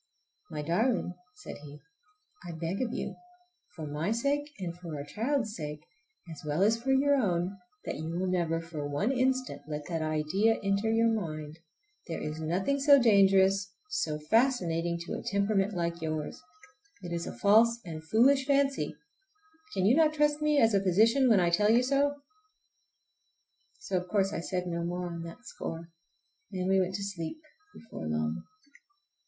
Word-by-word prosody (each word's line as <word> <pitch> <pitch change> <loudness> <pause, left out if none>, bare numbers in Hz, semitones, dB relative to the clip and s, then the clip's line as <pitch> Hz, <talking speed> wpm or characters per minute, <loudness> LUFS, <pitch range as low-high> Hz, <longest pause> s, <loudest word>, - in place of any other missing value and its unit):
"My 150 -1 -4
darling," 180 - +1 0.2
said - - -9
he, 145 0 -11 0.6
"I 175 -1 -7
beg 165 +5 -3
of 245 -3 -1
you, - - -4 0.6
for 160 - -6
my 150 +5 -2
sake 280 +5 0
and 175 -4 -5
for 170 -3 -8
our 140 - -5
child's 220 - -2
sake, 150 -1 -6 0.5
as 160 - -9
well 150 +4 0
as 215 +2 +4
for 270 +2 0
your 280 +2 +4
own, 185 -4 0 0.3
that - - -3
you 160 +1 -4
will 175 +3 -2
never 170 -3 0
for 165 -3 -6
one 165 - 0
instant 260 0 0
let 150 -1 -5
that 165 -2 -2
idea 155 +8 +1
enter 200 +2 +1
your 225 +1 +3
mind! 155 -6 -4 0.5
There 165 - -4
is 155 +1 -5
nothing 190 - 0
so 280 0 +7
dangerous, 195 -4 +4 0.2
so 155 - -1
fascinating, 170 - +1
to 170 - -6
a - - -4
temperament 200 0 0
like 170 -1 -2
yours. 155 +5 -4 0.6
It 175 -1 -5
is 170 0 -3
a - - -7
false 225 - +5
and 160 -2 -7
foolish 265 +10 +3
fancy. 275 - +1 0.8
Can 190 - +1
you 225 +6 +5
not 310 -1 +4
trust 295 0 +2
me 300 -1 +2
as 225 -3 +4
a 200 - +3
physician 225 +8 +4
when 215 -4 +5
I 175 -1 +2
tell 210 +5 +3
you 235 +3 +5
so?" 280 +2 +2 1.6
So 435 - -2
of 180 0 -3
course 195 0 +1
I - - -2
said 180 +1 -3
no 170 -1 -3
more 175 +1 -3
on 170 -1 -5
that 165 - -11
score, 165 +1 -7 0.6
and 185 -2 -2
we 190 0 +4
went 185 0 0
to 200 - -3
sleep 195 - -5 0.4
before 150 - -8
long. 80 0 -1
185 Hz, 170 wpm, -30 LUFS, 165-230 Hz, 1.6 s, so